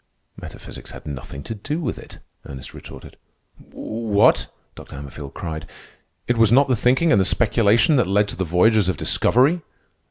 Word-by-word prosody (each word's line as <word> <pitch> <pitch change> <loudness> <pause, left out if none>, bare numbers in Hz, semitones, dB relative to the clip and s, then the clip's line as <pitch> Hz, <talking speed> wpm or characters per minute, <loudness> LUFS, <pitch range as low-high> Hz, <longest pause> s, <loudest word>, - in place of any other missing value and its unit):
"Metaphysics - - -10
had - - -11
nothing 70 -1 -7
to 115 - -5
do 145 +9 -4
with 145 -8 -4
it," - - -13 0.3
Ernest 65 -2 -9
retorted. - - -12 0.4
"What?" 110 -2 0 0.2
Dr. - - -12
Hammerfield 70 0 -9
cried. 80 -2 -6 0.6
"It 120 -1 0
was 115 -2 +4
not 135 +4 +6
the 130 - +2
thinking 130 +8 +2
and 100 - +4
the - - +2
speculation 115 - +3
that 120 -7 +2
led 100 +2 +2
to - - -5
the 95 - -2
voyages 95 +4 +3
of 90 - -1
discovery?" 140 - +2
105 Hz, 165 wpm, -21 LUFS, 85-125 Hz, 0.6 s, not